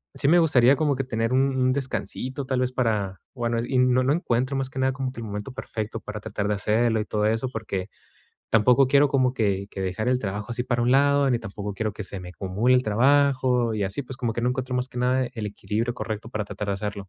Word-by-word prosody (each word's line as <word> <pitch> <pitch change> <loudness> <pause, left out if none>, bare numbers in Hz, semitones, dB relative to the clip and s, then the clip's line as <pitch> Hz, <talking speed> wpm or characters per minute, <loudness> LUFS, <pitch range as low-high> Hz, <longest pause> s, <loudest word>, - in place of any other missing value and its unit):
sí 140 - 0
me 175 +2 +6
gustaría 140 -5 +5
como 150 -3 +1
que 135 - -2
tener 115 -1 -1
un 135 +1 +2
un 130 0 +2
descansito 130 0 -3
tal 130 -1 0
vez 125 - 0
para 105 -7 -1 0.2
bueno 120 -2 -1
es 115 - -1
y 130 - 0
no 125 0 +4
encuentro 130 -4 0
más 135 -1 -2
que 130 - -6
nada 130 0 +2
como 130 -1 -3
que 125 - -10
el - - -5
momento 105 +4 -5
perfecto 115 -4 -5
para 105 0 -6
tratar 105 -1 -3
de - - +2
hacerlo 110 +2 +1
y 105 - -4
todo 105 -1 -1
eso. 115 +4 0
Porque 105 -5 -4 0.6
tampoco 125 +4 +5
quiero 140 +2 +5
como 130 -2 +2
que 100 -4 0
que 95 - -7
dejar 95 +5 -2
el 125 0 +2
trabajo 100 -1 -4
así 120 +1 -3
para 120 -1 0
un 120 - +2
lado, 140 0 +4
ni 120 - +2
tampoco 105 -2 -6
quiero 110 0 -2
que 105 - -6
se 95 +1 -5
me 90 0 -8
acumule 100 +7 +1
el 125 - +2
trabajo 130 0 +3
y 105 - -1
así, 100 +9 -3
pues, 130 0 -8
como 120 -3 -1
que 120 - -3
no 125 - +2
encuentro 130 0 -3
más 125 +1 -1
que 125 - -7
nada 130 +1 +2
el 110 -3 -4
equilibrio 110 +3 -3
correcto 110 -2 -5
para 110 -3 -2
tratar 105 +1 -6
de - - +1
hacerlo. 100 -1 -5
120 Hz, 250 wpm, -25 LUFS, 105-130 Hz, 0.6 s, me